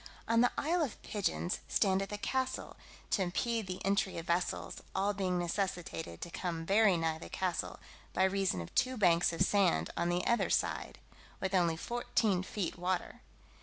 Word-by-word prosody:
On 230 Hz, 0 st, +4 dB
the 245 Hz, -, +4 dB
Isle 335 Hz, +4 st, +1 dB
of 280 Hz, -8 st, -2 dB
Pigeons 190 Hz, -3 st, -1 dB
standeth 195 Hz, -1 st, +1 dB
a 205 Hz, -, -2 dB
castle, 260 Hz, +4 st, -2 dB, 0.4 s
to 200 Hz, -, +2 dB
impede 220 Hz, +4 st, -1 dB
the 185 Hz, 0 st, -5 dB
entry 195 Hz, -2 st, +1 dB
of 165 Hz, -, -5 dB
vessels, 175 Hz, 0 st, -1 dB
all 200 Hz, +2 st, +2 dB
being 185 Hz, -2 st, 0 dB
necessitated 175 Hz, -, -3 dB
to 175 Hz, -, -6 dB
come 165 Hz, -3 st, -3 dB
very 200 Hz, 0 st, +5 dB
nigh 160 Hz, -1 st, -1 dB
the -, -, -9 dB
castle, 185 Hz, -2 st, -2 dB, 0.3 s
by 185 Hz, -, +2 dB
reason 190 Hz, -, +1 dB
of 85 Hz, -, -9 dB
two 255 Hz, 0 st, +1 dB
banks 175 Hz, -5 st, +4 dB
of 170 Hz, +2 st, +1 dB
sand 185 Hz, -, +2 dB
on 170 Hz, -, 0 dB
the 175 Hz, +1 st, 0 dB
other 235 Hz, -, +2 dB
side, -, -, 0 dB, 0.4 s
with 190 Hz, 0 st, -2 dB
only 170 Hz, -3 st, +3 dB
fourteen 235 Hz, -3 st, 0 dB
feet 185 Hz, -2 st, -3 dB
water. 180 Hz, 0 st, -2 dB
190 Hz, 170 wpm, -33 LUFS, 175-205 Hz, 0.4 s, very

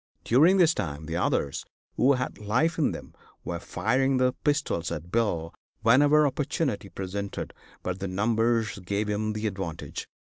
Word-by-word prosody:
During 160 Hz, +11 st, +5 dB
this 170 Hz, -3 st, +5 dB
time 75 Hz, -, -4 dB
the 80 Hz, +1 st, -4 dB
others, 75 Hz, -5 st, 0 dB, 0.3 s
who 135 Hz, +3 st, +4 dB
had 125 Hz, -1 st, -3 dB
life 155 Hz, +11 st, +1 dB
in 155 Hz, -, +3 dB
them, -, -, -8 dB, 0.3 s
were 85 Hz, -1 st, -4 dB
firing 130 Hz, +9 st, +1 dB
their 130 Hz, 0 st, +3 dB
pistols 145 Hz, -, -1 dB
at 85 Hz, +1 st, -6 dB
Bill 85 Hz, -8 st, 0 dB, 0.3 s
whenever 145 Hz, +6 st, +5 dB
opportunity 135 Hz, -5 st, -1 dB
presented, 95 Hz, +1 st, -5 dB, 0.3 s
but 90 Hz, 0 st, -3 dB
their 95 Hz, -1 st, -3 dB
numbers 110 Hz, +2 st, +1 dB
gave 100 Hz, +3 st, -2 dB
him 105 Hz, +1 st, -1 dB
the 110 Hz, +1 st, -3 dB
advantage. 95 Hz, -6 st, -4 dB
110 Hz, 150 wpm, -27 LUFS, 95-130 Hz, 0.3 s, During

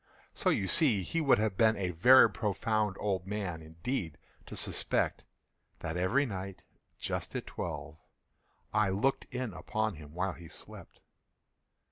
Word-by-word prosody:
So -, -, +1 dB
you 95 Hz, -, +1 dB
see 115 Hz, -, +4 dB
he 165 Hz, -, -1 dB
would 140 Hz, -3 st, +5 dB
have 105 Hz, -2 st, 0 dB
been 110 Hz, +1 st, +4 dB
a 95 Hz, -2 st, -1 dB
very 120 Hz, +10 st, +8 dB
profound 105 Hz, +1 st, -1 dB
old 95 Hz, -3 st, -1 dB
man, 95 Hz, -5 st, -3 dB
indeed, 80 Hz, -, -4 dB, 0.3 s
to -, -, -7 dB
suspect -, -, 0 dB, 0.6 s
that 80 Hz, -, -3 dB
every 110 Hz, +11 st, +2 dB
night, 95 Hz, -4 st, -6 dB, 0.3 s
just -, -, -4 dB
at -, -, -3 dB
twelve, 80 Hz, -, -6 dB, 0.7 s
I 105 Hz, -1 st, +3 dB
looked 105 Hz, +8 st, +1 dB
in 125 Hz, -4 st, -3 dB
upon 110 Hz, +2 st, -2 dB
him 75 Hz, 0 st, -12 dB
while 95 Hz, +1 st, -1 dB
he 85 Hz, -1 st, -11 dB
slept. -, -, -11 dB
100 Hz, 145 wpm, -31 LUFS, 90-110 Hz, 0.7 s, very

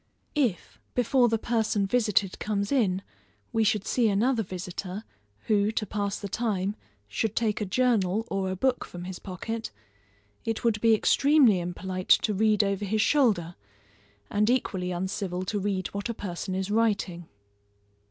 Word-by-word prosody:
If, 250 Hz, -, -1 dB, 0.2 s
before 245 Hz, 0 st, +3 dB
the 225 Hz, -, +2 dB
person 220 Hz, -3 st, 0 dB
visited 205 Hz, -3 st, +1 dB
comes 200 Hz, -1 st, -1 dB
in, 195 Hz, -8 st, +2 dB, 0.5 s
we 225 Hz, -, +3 dB
should 215 Hz, -1 st, +1 dB
see 235 Hz, -3 st, +2 dB
another 225 Hz, +4 st, +2 dB
visitor, 185 Hz, +1 st, -5 dB, 0.4 s
who, 210 Hz, 0 st, +2 dB
to 215 Hz, -, -1 dB
pass 200 Hz, -1 st, -2 dB
the 200 Hz, -, -5 dB
time, 200 Hz, -2 st, -1 dB, 0.3 s
should 215 Hz, -, -2 dB
take 220 Hz, -2 st, 0 dB
a 210 Hz, -, -1 dB
journal 220 Hz, -2 st, +1 dB
or 195 Hz, -1 st, -1 dB
a 185 Hz, -, -2 dB
book 255 Hz, +5 st, +1 dB
from 175 Hz, 0 st, -9 dB
his 185 Hz, 0 st, -6 dB
pocket, 220 Hz, +4 st, -5 dB, 0.7 s
it 225 Hz, -1 st, -2 dB
would 220 Hz, -3 st, +1 dB
be 225 Hz, -1 st, +5 dB
extremely 275 Hz, -3 st, +4 dB
impolite 185 Hz, +1 st, -5 dB
to 215 Hz, -, +1 dB
read 215 Hz, +1 st, +3 dB
over 200 Hz, 0 st, -1 dB
his 210 Hz, +2 st, +1 dB
shoulder, 210 Hz, -, +2 dB, 0.8 s
and 210 Hz, +2 st, +2 dB
equally 190 Hz, -8 st, 0 dB
uncivil 185 Hz, 0 st, -3 dB
to 205 Hz, +2 st, -1 dB
read 195 Hz, -1 st, -1 dB
what 200 Hz, +3 st, -4 dB
a 235 Hz, -, -2 dB
person 185 Hz, -1 st, -4 dB
is 190 Hz, +1 st, -2 dB
writing. 200 Hz, -6 st, 0 dB
205 Hz, 155 wpm, -27 LUFS, 190-225 Hz, 0.8 s, be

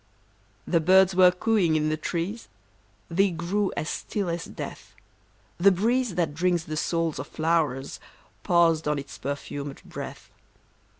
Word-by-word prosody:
The 170 Hz, -, +2 dB
birds 190 Hz, +3 st, +5 dB
were 180 Hz, 0 st, +7 dB
cooing 180 Hz, -2 st, +1 dB
in 155 Hz, 0 st, +1 dB
the 155 Hz, -, +1 dB
trees, 175 Hz, +8 st, -4 dB, 0.6 s
They 195 Hz, +4 st, +2 dB
grew 180 Hz, +4 st, -1 dB
as 155 Hz, -, -2 dB
still 200 Hz, +1 st, -3 dB
as 170 Hz, -1 st, -3 dB
death; -, -, -8 dB, 0.6 s
The 195 Hz, +3 st, +7 dB
breeze 230 Hz, +3 st, +1 dB
that 165 Hz, -5 st, 0 dB
drinks 175 Hz, +1 st, +1 dB
the 155 Hz, -, -5 dB
souls 165 Hz, -1 st, -1 dB
of 135 Hz, -, -5 dB
flow'rs 155 Hz, -5 st, -1 dB, 0.4 s
Paused 165 Hz, -3 st, +3 dB
on 150 Hz, 0 st, +1 dB
its 140 Hz, -2 st, -8 dB
perfumed 140 Hz, 0 st, -5 dB
breath. -, -, -8 dB
170 Hz, 140 wpm, -26 LUFS, 155-185 Hz, 0.6 s, were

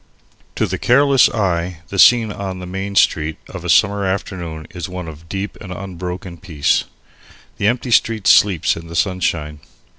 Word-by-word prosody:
To -, -, +1 dB
the -, -, -4 dB
careless 135 Hz, +2 st, +4 dB
eye 90 Hz, -5 st, -2 dB
the 95 Hz, -, -4 dB
scene 115 Hz, -1 st, +6 dB
on 95 Hz, -2 st, -5 dB
the 90 Hz, -, -7 dB
Main 95 Hz, +2 st, -5 dB
Street 80 Hz, -4 st, +2 dB
of -, -, -8 dB
a -, -, -4 dB
summer 100 Hz, 0 st, +3 dB
afternoon 90 Hz, -4 st, -4 dB
is 90 Hz, 0 st, -6 dB
one 90 Hz, -1 st, -6 dB
of 80 Hz, +1 st, -11 dB
deep 100 Hz, +2 st, -5 dB
and 95 Hz, -, -8 dB
unbroken 90 Hz, -1 st, -6 dB
peace. 80 Hz, -7 st, 0 dB, 0.7 s
The 100 Hz, -, +2 dB
empty 120 Hz, +2 st, -1 dB
street 110 Hz, -2 st, +2 dB
sleeps 95 Hz, -6 st, +4 dB
in 80 Hz, 0 st, -9 dB
the 85 Hz, -, -9 dB
sunshine. 85 Hz, -5 st, -1 dB
95 Hz, 170 wpm, -18 LUFS, 85-100 Hz, 0.7 s, scene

